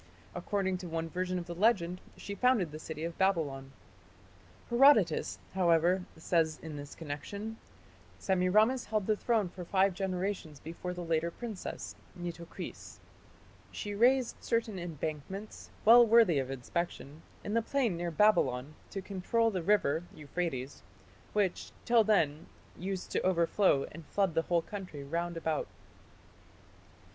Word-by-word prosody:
According 190 Hz, 0 st, -1 dB
to 180 Hz, -, -7 dB
one 165 Hz, 0 st, -3 dB
version 185 Hz, +1 st, -2 dB
of 175 Hz, -, -4 dB
the 175 Hz, -, -6 dB
legend 180 Hz, -2 st, +2 dB, 0.2 s
she 200 Hz, -, -6 dB
founded 220 Hz, -, +2 dB
the 155 Hz, -, -7 dB
city 155 Hz, 0 st, -6 dB
of 170 Hz, 0 st, -5 dB
Babylon. 150 Hz, -9 st, 0 dB, 1.0 s
Herodotus, 235 Hz, -, +5 dB, 0.2 s
however, 180 Hz, 0 st, +3 dB
says 160 Hz, -1 st, +1 dB
in 160 Hz, -2 st, -6 dB
this 145 Hz, 0 st, -8 dB
connection: 200 Hz, +9 st, -6 dB, 0.6 s
"Semiramis 210 Hz, +7 st, +2 dB
held 215 Hz, -2 st, -1 dB
the 215 Hz, -, +2 dB
throne 220 Hz, -2 st, +1 dB
for 180 Hz, +1 st, -8 dB
five 190 Hz, +2 st, +2 dB
generations 185 Hz, -4 st, -3 dB
before 170 Hz, +4 st, -6 dB
the 180 Hz, -, -5 dB
later 165 Hz, 0 st, +1 dB
princess 220 Hz, +2 st, -6 dB, 0.2 s
(Nitocris).... 170 Hz, -1 st, -7 dB, 0.7 s
She 205 Hz, -, -5 dB
raised 245 Hz, +4 st, +3 dB
certain 225 Hz, -4 st, 0 dB
embankments, 170 Hz, +4 st, -6 dB, 0.2 s
well 235 Hz, +2 st, +9 dB
worthy 225 Hz, -9 st, +5 dB
of 130 Hz, -1 st, -3 dB
inspection, 145 Hz, +2 st, -4 dB, 0.2 s
in 205 Hz, -, -3 dB
the 230 Hz, -, +3 dB
plain 235 Hz, -4 st, 0 dB
near 170 Hz, +1 st, -2 dB
Babylon, 150 Hz, -8 st, +2 dB, 0.2 s
to 195 Hz, -, -5 dB
control 225 Hz, +4 st, 0 dB
the 185 Hz, -3 st, -2 dB
river 165 Hz, -4 st, +2 dB
(Euphrates), 145 Hz, -3 st, -4 dB, 0.5 s
which, 200 Hz, -4 st, 0 dB
till 235 Hz, -2 st, +5 dB
then, 165 Hz, -8 st, +1 dB, 0.3 s
used 190 Hz, 0 st, -5 dB
to -, -, 0 dB
overflow 170 Hz, -4 st, +3 dB
and 165 Hz, +2 st, -10 dB
flood 195 Hz, -4 st, +1 dB
the 165 Hz, -, +2 dB
whole 170 Hz, 0 st, +1 dB
country 185 Hz, -8 st, -7 dB
round 170 Hz, +4 st, -3 dB
about." 160 Hz, -2 st, -1 dB
180 Hz, 135 wpm, -31 LUFS, 165-205 Hz, 1.0 s, well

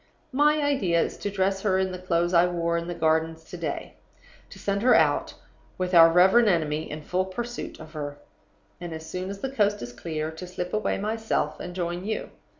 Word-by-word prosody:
"My 295 Hz, +3 st, +3 dB
idea 245 Hz, -13 st, +2 dB
is -, -, 0 dB
to 205 Hz, -, -3 dB
dress 195 Hz, -1 st, 0 dB
her 195 Hz, -3 st, +2 dB
in 190 Hz, 0 st, 0 dB
the 185 Hz, -, -6 dB
clothes 175 Hz, -1 st, 0 dB
I 175 Hz, +1 st, +6 dB
wore 170 Hz, -1 st, -1 dB
in 170 Hz, 0 st, -2 dB
the 175 Hz, -, -4 dB
Gardens 160 Hz, 0 st, +1 dB
to 170 Hz, -, -10 dB
day; 165 Hz, -4 st, -5 dB, 0.5 s
to -, -, -12 dB
send 200 Hz, 0 st, -1 dB
her 250 Hz, +2 st, +5 dB
out, -, -, +2 dB, 0.4 s
with 185 Hz, 0 st, -2 dB
our 165 Hz, -1 st, +9 dB
reverend 190 Hz, +7 st, +6 dB
enemy 155 Hz, -3 st, 0 dB
in 155 Hz, 0 st, -6 dB
full 185 Hz, +4 st, 0 dB
pursuit 240 Hz, +6 st, -6 dB
of 155 Hz, +1 st, -11 dB
her; 145 Hz, -2 st, -5 dB, 0.6 s
and, 175 Hz, -2 st, -6 dB
as 160 Hz, 0 st, -7 dB
soon 185 Hz, +3 st, -4 dB
as 200 Hz, 0 st, -7 dB
the 270 Hz, -, -3 dB
coast 205 Hz, -5 st, +1 dB
is 120 Hz, 0 st, -7 dB
clear, 155 Hz, +4 st, -4 dB
to 160 Hz, +3 st, -8 dB
slip 180 Hz, 0 st, -5 dB
away 215 Hz, 0 st, 0 dB
myself 220 Hz, +2 st, -1 dB
and 180 Hz, 0 st, -7 dB
join 175 Hz, 0 st, -3 dB
you. 215 Hz, +2 st, -3 dB
180 Hz, 210 wpm, -26 LUFS, 165-200 Hz, 0.6 s, our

